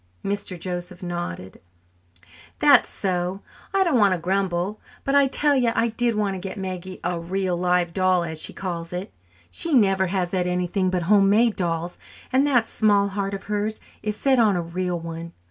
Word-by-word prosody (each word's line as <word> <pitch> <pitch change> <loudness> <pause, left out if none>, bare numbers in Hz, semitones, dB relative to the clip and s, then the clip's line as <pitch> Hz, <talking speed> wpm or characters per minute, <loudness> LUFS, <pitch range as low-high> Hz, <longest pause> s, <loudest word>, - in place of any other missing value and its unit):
Mr. 200 -3 -3
Joseph 180 +1 -5
nodded. 175 - -5 1.0
"That's - - +5
so. 185 0 -2 0.3
I 390 0 +3
don't 315 -9 +2
want 200 -3 +5
to - - -5
grumble; 190 +2 -1 0.2
but 275 - -1
I 280 -1 +5
tell 290 +2 +3
you 245 -3 +2
I 230 - +2
did 235 0 0
want 205 -2 0
to 190 - -5
get 190 +2 -6
Maggie 185 -1 -5
a 175 0 -1
'real 185 +1 -1
live 180 -1 +1
doll,' 185 -2 +2
as 160 -2 -4
she - - -2
calls 170 -2 -5
it. 180 +2 -5 0.4
She 330 -3 +1
never 195 -5 +3
has 180 -1 -1
had 180 -2 0
anything 180 +1 0
but 180 -1 -1
homemade 210 +4 +4
dolls, 170 -2 -2 0.3
and 270 +3 +4
that 245 -5 +3
small 205 -3 +2
heart 200 0 -2
of 195 - -8
hers 210 +1 -2 0.2
is 210 -1 -2
set 265 +3 +2
on 215 -4 +4
a 175 - 0
real 175 +1 -2
one. 165 0 -7
190 Hz, 185 wpm, -24 LUFS, 175-210 Hz, 1.0 s, That's